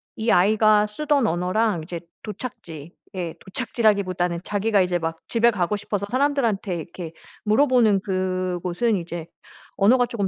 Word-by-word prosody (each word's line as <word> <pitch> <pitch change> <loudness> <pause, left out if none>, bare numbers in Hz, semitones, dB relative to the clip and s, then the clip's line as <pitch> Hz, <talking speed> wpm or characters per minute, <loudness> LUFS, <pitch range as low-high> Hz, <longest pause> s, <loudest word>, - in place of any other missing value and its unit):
이 225 0 0
아이가 210 +2 +4
쓰던 280 +2 +1
언어랑 180 +1 0
이제 170 0 -6 0.2
도착지 175 - -8 0.2
예 175 -3 -3
도착지라기보다는 190 -6 0
자기가 205 0 +1
이제 180 -1 0
막 165 0 -3
집에 235 0 +4
가고 205 -1 0
싶어서 200 0 -3
사람들한테 250 -9 +1
이렇게 165 0 -7 0.3
물어보는 225 -4 +4
그곳은 185 +2 -1
이제 170 -1 -6 0.5
언어가 245 +5 +4
쪼금 205 -5 -2
200 Hz, 340 characters per minute, -23 LUFS, 180-225 Hz, 0.5 s, 아이가